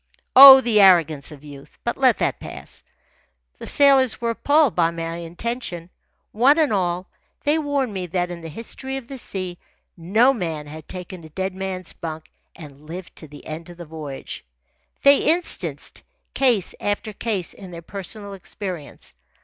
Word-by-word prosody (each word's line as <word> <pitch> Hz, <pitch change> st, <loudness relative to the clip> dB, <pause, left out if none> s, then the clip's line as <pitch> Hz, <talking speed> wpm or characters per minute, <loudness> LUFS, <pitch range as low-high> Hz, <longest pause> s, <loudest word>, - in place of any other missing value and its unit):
Oh, 265 Hz, 0 st, +12 dB
the 225 Hz, -4 st, +3 dB
arrogance 160 Hz, -7 st, +4 dB
of 145 Hz, -1 st, -13 dB
youth! 140 Hz, -2 st, -13 dB
But -, -, -1 dB
let -, -, +3 dB
that -, -, -1 dB
pass. -, -, -9 dB, 0.8 s
The -, -, -8 dB
sailors 270 Hz, -4 st, +4 dB
were 235 Hz, -1 st, -1 dB
appalled 285 Hz, +3 st, +2 dB
by 165 Hz, -2 st, +3 dB
my 165 Hz, 0 st, -5 dB
intention. 175 Hz, 0 st, -5 dB, 0.4 s
One 260 Hz, +8 st, +4 dB
and 305 Hz, -8 st, +2 dB
all, 180 Hz, -1 st, -1 dB, 0.4 s
they 300 Hz, +2 st, +2 dB
warned 285 Hz, -6 st, -1 dB
me 185 Hz, -2 st, -4 dB
that 175 Hz, +1 st, -2 dB
in 170 Hz, -1 st, -7 dB
the 165 Hz, -, -8 dB
history 265 Hz, -, -6 dB
of 260 Hz, -3 st, -9 dB
the 270 Hz, 0 st, -7 dB
sea 185 Hz, -5 st, -5 dB, 0.4 s
no 215 Hz, +10 st, +3 dB
man 165 Hz, -, -4 dB
had 155 Hz, +1 st, -11 dB
taken 180 Hz, -1 st, -8 dB
a 160 Hz, -, -12 dB
dead 190 Hz, +4 st, -3 dB
man's 190 Hz, -1 st, -5 dB
bunk 160 Hz, -1 st, -8 dB, 0.2 s
and 150 Hz, -1 st, -13 dB
lived 175 Hz, +3 st, -8 dB
to 155 Hz, -, -8 dB
the 145 Hz, 0 st, -14 dB
end 160 Hz, +2 st, -7 dB
of 175 Hz, -, -12 dB
the 175 Hz, -, -9 dB
voyage. 150 Hz, -4 st, -8 dB, 0.6 s
They 280 Hz, 0 st, +7 dB, 0.2 s
instanced 355 Hz, -, -4 dB, 0.3 s
case 240 Hz, -9 st, +2 dB
after 205 Hz, +1 st, -3 dB
case 200 Hz, -4 st, -2 dB
in 190 Hz, -2 st, -12 dB
their 170 Hz, -1 st, -9 dB
personal 200 Hz, +3 st, -7 dB
experience. 185 Hz, -, -8 dB
185 Hz, 165 wpm, -22 LUFS, 165-235 Hz, 0.8 s, Oh